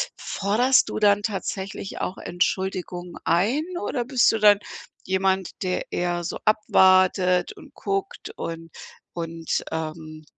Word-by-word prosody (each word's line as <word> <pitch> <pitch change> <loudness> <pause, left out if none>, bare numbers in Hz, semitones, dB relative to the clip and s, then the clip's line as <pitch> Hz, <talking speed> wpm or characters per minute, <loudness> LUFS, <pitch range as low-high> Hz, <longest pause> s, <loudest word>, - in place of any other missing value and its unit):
forderst 230 +7 +2
du - - -3
dann 205 -1 +4
tatsächlich 195 -2 -4
auch 185 - -3
Entschuldigungen 180 -1 -2
ein 205 - +2 0.2
oder 250 -12 -2
bist 255 -2 +4
du 225 - -1
dann 205 -1 +6 0.5
jemand, 190 0 0
der 180 -1 -2
eher 175 0 -1
so - - -4
abwartet 185 -3 +4
und - - -15
guckt 395 +2 -3
und 165 0 -6 0.4
und, 165 -1 -3
ähm, 155 -1 -5
190 Hz, 120 wpm, -24 LUFS, 175-210 Hz, 0.5 s, dann